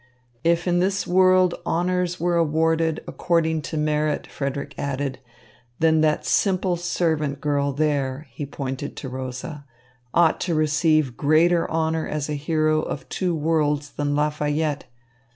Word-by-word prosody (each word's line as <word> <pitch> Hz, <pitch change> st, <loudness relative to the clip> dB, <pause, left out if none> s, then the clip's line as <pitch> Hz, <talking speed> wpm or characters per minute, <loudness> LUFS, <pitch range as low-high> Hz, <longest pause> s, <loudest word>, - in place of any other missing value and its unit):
"If 170 Hz, +1 st, +2 dB
in 175 Hz, 0 st, +2 dB
this 195 Hz, +2 st, 0 dB
world 185 Hz, 0 st, +4 dB
honours 180 Hz, +1 st, 0 dB
were 175 Hz, +1 st, +1 dB
awarded 160 Hz, 0 st, +1 dB
according 160 Hz, -2 st, 0 dB
to 155 Hz, -, -4 dB
merit," 150 Hz, 0 st, 0 dB
Frederick 140 Hz, 0 st, -4 dB
added, 140 Hz, -1 st, -3 dB, 0.6 s
"then 160 Hz, -1 st, +3 dB
that 155 Hz, -1 st, +1 dB
simple 185 Hz, -2 st, +1 dB
servant 160 Hz, -5 st, -1 dB
girl 140 Hz, -1 st, 0 dB
there" 140 Hz, -1 st, -1 dB
he 145 Hz, -, -6 dB
pointed 135 Hz, 0 st, -5 dB
to 135 Hz, -, -6 dB
Rosa 130 Hz, +4 st, -6 dB, 0.5 s
"ought 165 Hz, +1 st, +3 dB
to 170 Hz, -2 st, -1 dB
receive 155 Hz, -4 st, +2 dB
greater 165 Hz, +4 st, +3 dB
honour 160 Hz, 0 st, 0 dB
as 150 Hz, -1 st, -3 dB
a -, -, -1 dB
hero 155 Hz, +1 st, +1 dB
of 145 Hz, -, -5 dB
two 180 Hz, -3 st, -1 dB
worlds 150 Hz, -2 st, 0 dB
than 145 Hz, 0 st, -1 dB
Lafayette. 150 Hz, 0 st, 0 dB
155 Hz, 135 wpm, -23 LUFS, 145-170 Hz, 0.6 s, world